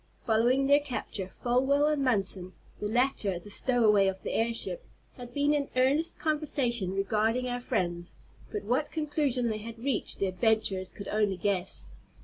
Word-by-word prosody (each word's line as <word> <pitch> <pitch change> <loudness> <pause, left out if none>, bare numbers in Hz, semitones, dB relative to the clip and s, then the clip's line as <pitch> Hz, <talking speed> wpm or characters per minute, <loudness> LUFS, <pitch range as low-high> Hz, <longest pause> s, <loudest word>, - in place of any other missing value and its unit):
Following 240 +4 +3
their 285 +1 +6
capture, 240 -8 -5
Folwell 265 +4 +3
and 300 -2 +1
Munson, 195 -6 0 0.3
the 210 - -2
latter 220 -5 +1
the 205 +4 -10
stowaway 215 -5 +3
of 190 0 -1
the - - -3
airship, 235 - -1 0.3
had 245 -1 -9
been 285 +3 +2
in 285 -1 0
earnest 275 +6 +2
conversation 255 - 0
regarding 220 +5 +1
our 245 0 -3
friends, 175 -5 -2 0.4
but 420 - -3
what 280 +5 0
conclusion 290 -6 0
they 215 -1 -2
had 230 +2 -8
reached 255 +3 -2
the - - 0
adventurers 195 -1 +1
could 200 - -9
only 210 -3 +1
guess. 180 - -2
235 Hz, 155 wpm, -29 LUFS, 200-275 Hz, 0.4 s, their